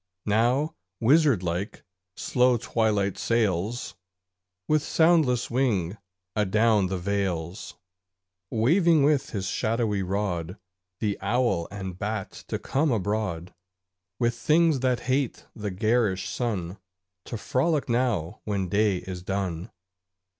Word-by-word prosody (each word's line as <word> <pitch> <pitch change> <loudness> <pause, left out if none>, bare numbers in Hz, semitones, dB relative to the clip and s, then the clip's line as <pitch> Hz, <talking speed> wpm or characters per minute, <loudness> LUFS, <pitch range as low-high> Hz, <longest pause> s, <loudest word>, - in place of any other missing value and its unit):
Now, 120 +8 +2 0.3
wizard 135 - +4
like, 90 +4 -3 0.3
slow 125 -1 +2
Twilight 105 -4 0
sails 110 -1 0 0.7
With 155 -1 +3
soundless 155 -7 +3
wing 110 -8 +1 0.4
adown 105 0 +3
the 95 +1 -2
vales, 95 -1 -3 0.7
Waving 160 - +4
with 145 -1 +2
his 100 -3 -3
shadowy 110 0 0
rod 90 -2 -2 0.4
The 105 -3 -1
owl 100 -4 +1
and 95 -3 -6
bat 105 -1 -3 0.2
to - - -2
come 145 +2 0
abroad, 100 -5 -2 0.6
With 120 -1 +1
things 155 +4 +3
that 125 -1 +1
hate 130 +1 -1
the 105 -1 -4
garish 100 -1 +1
sun, 100 -6 -3 0.5
To 115 - -5
frolic 140 +7 0
now 115 -8 0
when 100 -3 -2
day 105 0 +2
is 90 0 -7
done. 95 0 -3
110 Hz, 110 wpm, -26 LUFS, 95-125 Hz, 0.7 s, wizard